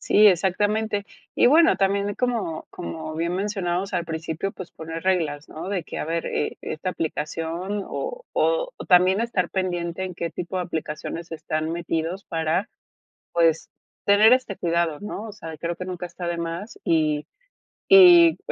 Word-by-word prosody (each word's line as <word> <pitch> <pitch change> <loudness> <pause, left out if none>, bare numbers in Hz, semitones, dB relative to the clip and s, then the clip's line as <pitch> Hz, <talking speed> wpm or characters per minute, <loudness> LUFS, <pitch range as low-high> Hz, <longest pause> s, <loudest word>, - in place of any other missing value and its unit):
Sí, 210 +1 +5
exactamente. 205 +3 +1 0.3
Y - - +4
bueno, 325 +4 +6
también 200 +1 +1
como 230 -10 -2
como 155 - -6
bien 170 +2 -1
mencionamos 195 -1 -2
al 175 -2 0
principio, 160 +3 -4
pues, 185 - -9
poner 165 +1 -7
reglas, 160 -6 0
¿no? 160 +4 -7
De 190 -4 -1
que - - -7
a - - -2
ver, 165 +1 -2
eh, - - -2
esta 185 +4 -4
aplicación, 165 +5 -3
o - - -5
o, - - +1 0.2
también 185 +3 +5
estar 200 -7 -1
pendiente 175 -1 -2
en 180 -2 -6
qué 170 0 -3
tipo 180 +1 -5
de 180 - 0
aplicaciones 165 0 -5
están 155 0 -3
metidos 170 +2 -3
para, 165 +5 -1 0.7
pues, 165 -2 +2 0.4
tener 210 +3 +6
este 255 -6 0
cuidado, 170 -2 0
¿no? 210 0 -5
O 210 - -8
sea, 165 -6 -8
creo 170 0 -3
que 180 - -6
nunca 180 -1 -5
está 175 0 -6
de 170 0 -2
más, 170 +6 -5
y 155 -2 +1 0.6
y, 350 -4 +8
175 Hz, 160 wpm, -24 LUFS, 165-200 Hz, 0.7 s, y